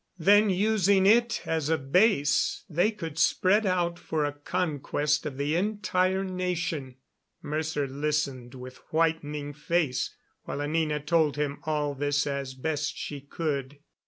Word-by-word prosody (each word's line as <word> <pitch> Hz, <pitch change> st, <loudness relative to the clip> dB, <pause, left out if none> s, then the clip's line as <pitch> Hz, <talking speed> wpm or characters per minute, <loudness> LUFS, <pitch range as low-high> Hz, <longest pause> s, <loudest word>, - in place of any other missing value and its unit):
Then, 205 Hz, +5 st, +5 dB
using 195 Hz, 0 st, +3 dB
it 235 Hz, +3 st, +4 dB
as 160 Hz, -2 st, -1 dB
a 160 Hz, -, +3 dB
base, 145 Hz, +2 st, +2 dB
they 175 Hz, +6 st, +2 dB
could 165 Hz, -8 st, -6 dB
spread 195 Hz, +7 st, +3 dB
out 175 Hz, -2 st, 0 dB
for 155 Hz, -2 st, -1 dB
a 145 Hz, -, -2 dB
conquest 150 Hz, -1 st, -1 dB
of 135 Hz, -3 st, -6 dB
the 145 Hz, +3 st, 0 dB
entire 190 Hz, -1 st, +1 dB
nation. 175 Hz, -7 st, -3 dB, 0.5 s
Mercer 155 Hz, -1 st, -2 dB
listened 140 Hz, -3 st, -2 dB
with 130 Hz, 0 st, -9 dB
whitening 150 Hz, -3 st, 0 dB
face 150 Hz, -2 st, -1 dB, 0.3 s
while -, -, -4 dB
Anina 150 Hz, 0 st, 0 dB
told 150 Hz, 0 st, +2 dB
him 145 Hz, -1 st, -2 dB
all 150 Hz, -2 st, 0 dB
this 145 Hz, +1 st, 0 dB
as 140 Hz, -2 st, -3 dB
best 145 Hz, +1 st, -2 dB
she 145 Hz, -2 st, -5 dB
could. 140 Hz, -1 st, -3 dB
155 Hz, 135 wpm, -27 LUFS, 145-180 Hz, 0.5 s, Then